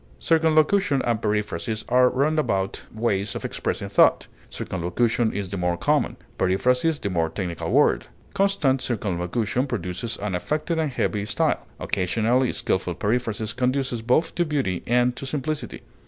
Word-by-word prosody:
Circumlocution 160 0 +3
and 115 -2 0
periphrasis 105 0 -2
are 125 0 +5
roundabout 135 -9 0
ways 105 -3 -1
of - - -4
expressing - - -3
thought; - - +4 0.2
circumlocution 110 +6 0
is 100 -2 -4
the 100 - -4
more 90 -1 0
common, - - +1 0.2
periphrasis 125 - +2
the 100 - -3
more 85 -2 +1
technical 85 -1 -4
word. - - +3 0.3
Constant 170 -10 +2
circumlocution 105 +4 -1
produces 110 0 -4
an 105 -1 -3
affected 150 - -1
and 155 -3 0
heavy 105 -5 -1
style; - - 0
occasionally, 115 +7 +1
skilful 90 -2 -1
periphrasis 110 +1 -1
conduces 125 -1 0
both 125 +8 +2
to 175 - +1
beauty 135 - -1
and 125 +1 +2
to 135 - -6
simplicity. 145 -2 -4
120 Hz, 140 wpm, -24 LUFS, 95-135 Hz, 0.3 s, are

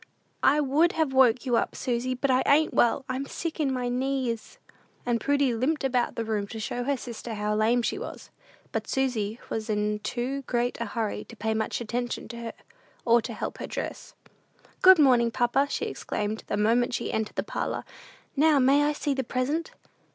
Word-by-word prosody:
"I 290 +2 +4
would 300 +5 +3
have 315 -4 0
woke 255 -1 +4
you 245 -2 +2
up, - - -1
Susy, 250 +1 -1
but 265 +2 0
I 255 0 +4
ain't 305 +3 +4
well; 240 +3 +3
I'm 260 +1 -3
sick 335 +2 -5
in 285 -3 +1
my 250 -1 -1
knees." 250 -2 -2 0.5
And 240 -1 0
Prudy 280 -3 +2
limped 275 +7 0
about 250 -2 +1
the 230 - -2
room 210 -2 -1
to 225 - -7
show 245 +3 -3
her 280 0 +1
sister 235 -1 -6
how 210 0 -1
lame 225 +3 +2
she 390 - -1
was. - - -8 0.4
But - - -3
Susy 240 -5 -1
was 220 0 -3
in 210 0 0
too 255 +5 -3
great 240 -1 -1
a - - 0
hurry 220 0 -3
to 230 - -12
pay 220 0 -1
much 220 +2 -2
attention 240 +1 -3
to 235 - -7
her, 235 -1 -6 0.5
or 235 0 +5
to 235 - -6
help 210 - -5
her - - -4
dress. - - -6 0.7
"Good 375 0 +9
morning, 250 -6 +5
papa!" 245 +3 +2
she - - -2
exclaimed, 210 +1 -3
the - - -1
moment 240 +4 +2
she - - -3
entered 220 -1 -2
the - - -1
parlor; - - -3 0.5
"now 300 +1 +5
may 275 +2 +4
I 300 - +1
see 290 -1 -1
the 265 -1 -1
present?" 260 +7 -1
245 Hz, 195 wpm, -27 LUFS, 230-275 Hz, 0.7 s, Good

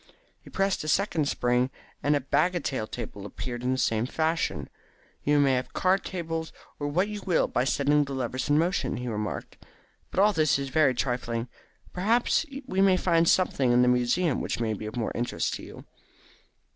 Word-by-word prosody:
He - - -14
pressed 195 -3 0
a - - -6
second 155 -3 +1
spring, 125 +1 +1 0.3
and 145 +1 +2
a 145 - 0
bagatelle 140 -4 0
table 100 - -7
appeared 120 +4 -6
in 125 +1 0
the 130 - 0
same 115 -2 +1
fashion. 160 - -1 0.6
"You 145 0 +3
may 140 -2 +4
have 125 0 -2
card 190 +1 +2
tables 165 -3 -4 0.3
or 145 - -2
what 180 +7 +1
you 210 -1 -5
will 180 -4 +2
by 125 - 0
setting 145 +2 +2
the 140 -1 -6
levers 130 +1 -3
in 145 - +4
motion," 175 +4 0
he 125 - -5
remarked. 105 -3 -4 0.5
"But - - -2
all 205 +2 +5
this 155 -5 +3
is 140 -1 -4
very 135 -2 +3
trifling. 120 -2 -2 0.4
Perhaps 230 - +2 0.2
we 195 -7 0
may 190 -1 +5
find 170 -2 +3
something 140 -9 +2
in 120 +1 +5
the - - +3
museum 125 +6 +2
which - - -3
may 115 -2 0
be 105 +1 -6
of 110 - -7
more 115 - -1
interest 120 +1 -2
to - - -11
you." - - -11
145 Hz, 190 wpm, -27 LUFS, 125-175 Hz, 0.6 s, all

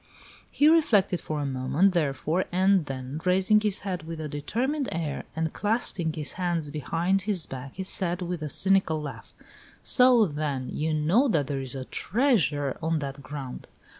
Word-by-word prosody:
He 290 - +3
reflected 215 - +3
for 155 -1 -4
a 145 - -2
moment, 135 +8 +1
therefore, 160 +2 0
and 185 -2 +3
then 135 +3 -5
raising 190 +3 +3
his 210 -2 +1
head 185 -3 -3
with 160 0 -7
a 155 - -4
determined 250 - -2
air, 160 -4 -3
and 160 0 -2
clasping 205 -6 0
his 155 -2 -4
hands 170 -4 -1
behind 165 +6 0
his 185 -6 +4
back, 130 0 -8
he 190 - -4
said, 180 -1 0
with 175 -1 -4
a 150 - -4
cynical 190 -2 +2
laugh: 150 -1 -8 0.5
"So, 250 -3 +5
then, 145 -5 -3
you 160 +1 -2
know 165 - +3
that 155 - +1
there 140 -1 -3
is 130 0 -3
a 130 -1 -5
TREASURE 165 - 0
on 160 0 0
that 140 -1 -5
ground!" 135 -2 -7
165 Hz, 170 wpm, -26 LUFS, 145-195 Hz, 0.5 s, So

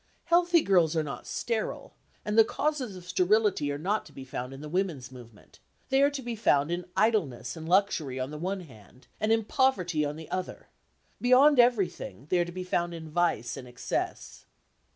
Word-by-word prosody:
Healthy 345 0 +4
girls 170 -4 +3
are 160 - +2
not 145 - -7
sterile, 230 -2 -3 0.3
and 210 -1 -1
the 225 - +8
causes 265 -3 -2
of 180 -1 -11
sterility 190 -4 +2
are 145 - -3
not 195 +8 -1
to - - -16
be 135 - -10
found 125 -1 -5
in 135 - -9
the 150 - -7
women's 160 -7 -2
movement; 115 -4 -15 0.3
they 270 0 +3
are 280 - +5
to 280 -2 -6
be 240 -1 -4
found 150 -8 +2
in 175 0 -2
idleness 160 - +1
and 160 0 -7
luxury 170 -9 +1
on 130 +2 -3
the 150 - -7
one 190 +3 -2
hand, 125 - -16
and 215 +1 +1
in 225 0 +3
poverty 185 - +1
on 145 0 -2
the 160 0 -10
other; 185 0 -5 0.5
beyond 255 +3 +6
everything, 190 - +1
they 180 - +3
are 175 - +2
to 175 - -8
be 185 +1 -5
found 175 -1 -1
in 160 -2 -9
vice 170 -8 0
and 130 -2 -9
excess. 125 0 -4
180 Hz, 195 wpm, -28 LUFS, 145-220 Hz, 0.5 s, the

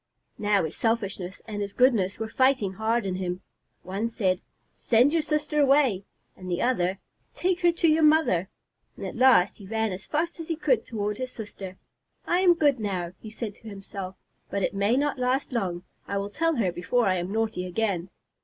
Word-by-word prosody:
Now 205 -1 +2
his 160 0 -4
selfishness 200 -5 -2
and 210 -2 -4
his 200 0 -4
goodness 225 -7 +3
were 225 - -3
fighting 255 -5 +2
hard 220 +2 0
in 185 -1 -2
him. 180 -1 -3 0.4
One 200 +5 -2
said, 190 -5 0 0.3
"Send 245 +5 +3
your 330 - +3
sister 300 0 -1
away," 270 -9 +3 0.3
and 185 -1 -9
the 175 0 -1
other, 190 -7 +1 0.4
"Take 360 0 0
her 345 -1 +5
to 335 0 +2
your 315 0 +4
mother." 300 - +4 0.5
At - - -6
last 250 -8 +5
he 200 - -11
ran 220 0 0
as 185 +2 -7
fast 335 +3 -1
as 325 - -6
he 330 - -1
could 260 -7 +1
toward 210 -2 -3
his 255 0 -4
sister. 195 -5 -8 0.5
"I 350 - +2
am 360 -2 +5
good 290 -6 +3
now," 185 -5 -2
he 215 - -9
said 215 -1 -5
to 225 - -11
himself, 195 -1 -7 0.3
"but 200 -1 -2
it - - 0
may 200 +5 +2
not 285 -1 0
last 255 +3 0
long. 180 -6 -2 0.2
I 200 - -2
will 200 +1 -3
tell 330 +6 +1
her 205 -8 +1
before 225 +8 0
I 185 -1 +2
am 175 +2 -3
naughty 220 -4 -1
again." 185 -2 -1
220 Hz, 195 wpm, -26 LUFS, 190-265 Hz, 0.5 s, her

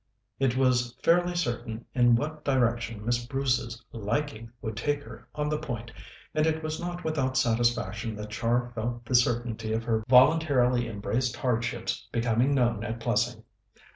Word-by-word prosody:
It 130 -2 +1
was 125 -2 +2
fairly 175 +1 +3
certain 120 -7 -3
in 120 -2 +5
what 150 +4 -3
direction 115 -5 0
Miss 120 0 +1
Bruce's 125 -3 -1
"liking" 115 +1 -3
would 110 -2 -5
take 145 +6 -1
her - - -12
on 150 0 -1
the 150 0 -1
point, 120 -6 -5 0.4
and 155 0 +2
it 160 0 0
was 155 0 -3
not 175 0 -5
without 135 -5 0
satisfaction 115 -3 +1
that 105 0 -7
Char 120 +2 0
felt 120 +1 -4
the 130 - -4
certainty 120 -2 +1
of 115 +1 -1
her 110 -1 0
voluntarily 130 -2 +5
embraced 115 +4 -1
hardships 120 -1 -2
becoming 120 +4 +2
known 120 -4 +1
at 115 +2 -4
Plessing. - - 0
120 Hz, 155 wpm, -28 LUFS, 115-135 Hz, 0.4 s, in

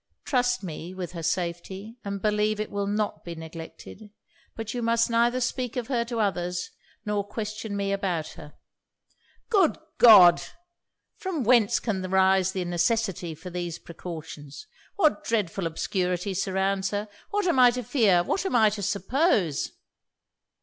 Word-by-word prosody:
Trust 245 -3 +1
me 170 +1 -7
with 180 -2 -5
her 170 -2 -7
safety, 180 +6 -3
and 200 -1 -5
believe 210 0 +1
it 215 - -3
will 200 0 -2
not 210 +1 -2
be 170 -1 -7
neglected. 165 +6 -10 0.5
But 225 0 -5
you 245 - -3
must 230 0 +2
neither 235 +2 +2
speak 250 -1 -2
of 245 -1 -4
her 240 -3 +1
to 235 -1 -4
others, 180 -3 -1 0.3
or 210 -1 0
question 215 0 -5
me 200 0 -1
about 185 -5 -1
her.' 150 0 -12 0.9
'Good 390 -8 +3 0.2
God! 190 -7 +9 0.8
from 360 -8 -3
whence 235 -3 +4
can 195 -5 -2
arise 190 0 +3
the 185 -2 -3
necessity 175 -1 0
for 180 +4 -10
these 175 -2 -4
precautions! 160 - -9 0.3
What 310 - +2
dreadful 195 -5 -1
obscurity 180 +3 -2
surrounds 190 +1 0
her! 205 +1 -3 0.2
What 410 -1 0
am 340 -8 +2
I 250 -1 +8
to 250 +1 -3
fear? 210 -8 +3
What 380 - -1
am 380 - -1
I 220 -3 +5
to 205 0 -5
suppose?' 200 - +1
200 Hz, 150 wpm, -26 LUFS, 180-230 Hz, 0.9 s, God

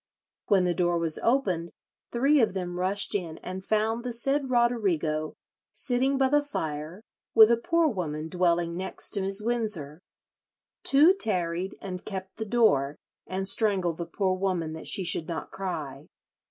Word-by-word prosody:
When 195 -3 +3
the 175 - +1
door 175 -1 +1
was 165 -2 +1
opened 190 -10 0 0.4
three 275 +4 +3
of 215 -4 +1
them 180 -1 -4
rushed 195 +4 +1
in 175 -6 -3
and 185 +1 -6
found 220 +3 0
the 250 - -3
said 270 +4 0
Roderigo 190 -11 0 0.4
sitting 265 +2 0
by 265 -1 +2
the 295 +1 +3
fire 160 - -5 0.3
with 220 0 +8
a - - +5
poor 335 +7 +1
woman 160 - -3
dwelling 170 -1 0
next 190 +2 -3
to 205 - +1
Mrs. 195 +2 +1
Wynsor. 210 -11 -1 0.8
Two 300 +7 +6
tarried 185 - 0
and 185 -2 -6
kept 190 -2 -7
the 220 - -4
door, 150 - +2 0.3
and 190 +1 -2
strangled 190 -6 +1
the 170 - -5
poor 190 +2 -1
woman 185 -4 -2
that 160 - -7
she 190 - +3
should 170 -2 +1
not 170 - -5
cry. 155 -8 -6
190 Hz, 160 wpm, -27 LUFS, 170-230 Hz, 0.8 s, with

